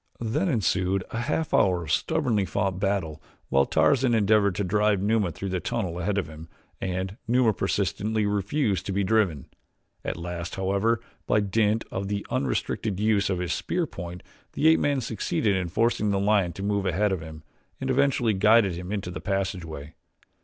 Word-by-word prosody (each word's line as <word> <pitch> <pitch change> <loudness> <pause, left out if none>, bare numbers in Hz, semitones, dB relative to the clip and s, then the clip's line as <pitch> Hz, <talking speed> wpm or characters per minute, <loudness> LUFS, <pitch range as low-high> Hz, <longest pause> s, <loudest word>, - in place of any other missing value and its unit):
Then 140 - 0
ensued 95 - +1
a 115 - -3
half 155 +6 -1
hour 90 -3 +3
of 80 - -5
stubbornly 120 - +1
fought 95 0 -1
battle 95 -6 -1 0.3
while 70 0 +3
Tarzan 130 -4 +3
endeavored 105 -2 +3
to 100 - -1
drive 105 +1 +2
Numa 105 -2 +1
through 95 +4 -5
the 95 0 -1
tunnel 95 -6 -3
ahead 100 +3 -1
of 95 -6 -1
him 80 +1 -11 0.3
and 95 +2 -3
Numa 120 -2 +3
persistently 100 +3 -1
refused 100 - 0
to - - -2
be 100 +1 +1
driven. 95 - +1 0.6
At - - -3
last, 85 0 -5
however, 100 +4 +1 0.3
by 105 - +3
dint 105 +2 +1
of 95 +1 -3
the 100 0 -3
unrestricted 95 +7 -1
use 105 -2 +2
of 95 - 0
his 90 -1 -2
spear 175 -1 -1
point, 90 - -8 0.3
the 160 - +4
ape 160 - +5
man 140 -2 +1
succeeded 105 -2 0
in 95 -2 -1
forcing 110 +2 +1
the 100 -1 +1
lion 100 -3 +2
to 95 - -7
move 100 -1 0
ahead 100 +3 +1
of 95 -4 -2
him 80 0 -10 0.4
and 135 0 -1
eventually 130 -4 +2
guided 105 0 +4
him 90 +2 -6
into 100 -4 -3
the 90 - -6
passageway. 85 -6 -3
100 Hz, 180 wpm, -26 LUFS, 90-110 Hz, 0.6 s, ape